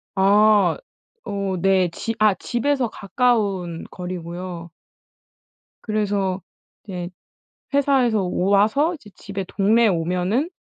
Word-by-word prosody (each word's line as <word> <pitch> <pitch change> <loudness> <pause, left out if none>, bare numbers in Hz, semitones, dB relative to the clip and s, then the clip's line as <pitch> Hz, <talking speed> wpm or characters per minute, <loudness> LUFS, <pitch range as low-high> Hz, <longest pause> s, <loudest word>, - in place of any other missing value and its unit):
아. 205 0 +4 0.5
어 200 -2 -2
네. 190 -1 +3
지 225 +7 -4
아 215 -3 +4
집에서 250 +1 -1
가까운 200 -6 -1
거리고요. 175 -1 -6 1.2
그래서 200 -3 -1 0.4
이제 180 -4 -6 0.7
'회사에서 260 -6 +3
와서 205 - +2
이제 225 -10 -13
집에 200 -1 -5
동네에 220 +3 +3
오면은 180 - 0
200 Hz, 205 characters per minute, -22 LUFS, 185-220 Hz, 1.2 s, 아